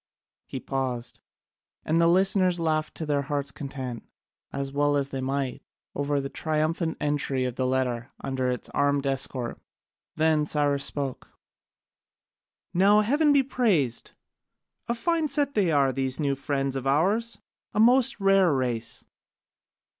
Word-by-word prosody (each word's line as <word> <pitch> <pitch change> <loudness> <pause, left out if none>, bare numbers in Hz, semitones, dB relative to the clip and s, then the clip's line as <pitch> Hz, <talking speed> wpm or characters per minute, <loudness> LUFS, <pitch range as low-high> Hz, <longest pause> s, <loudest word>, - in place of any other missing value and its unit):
He 135 - -5
paused, 125 -3 -3 0.7
and 165 +2 +2
the 165 - +5
listeners 185 0 +3
laughed 155 -2 -1
to 160 - -4
their 145 -1 +1
hearts' 140 0 -3
content, 130 -4 -6 0.5
as 140 0 -3
well 145 +1 +2
as 140 -1 -1
they 135 -1 -4
might, 135 0 -2 0.3
over 145 0 0
the 135 - -3
triumphant 160 +3 -1
entry 140 -3 0
of 125 - -2
the 130 +1 -1
letter 125 -1 -1
under 130 -1 -2
its 125 -1 -3
armed 145 0 +1
escort. 135 -3 -1 0.6
Then 155 -1 +3
Cyrus 145 -2 +1
spoke: 140 -3 -3 1.4
"Now 200 +4 +5
heaven 290 +8 +3
be 280 -1 +5
praised! 195 - 0 0.8
A 235 - +1
fine 325 +5 0
set 285 0 0
they 195 -6 +2
are, 140 -3 +3
these 130 +1 -1
new 140 -2 +1
friends 135 0 -2
of 135 0 -3
ours, 200 +12 +1 0.3
a 210 - -2
most 245 +1 +4
rare 195 -3 +4
race! 120 -4 -2
145 Hz, 140 wpm, -26 LUFS, 135-180 Hz, 1.4 s, the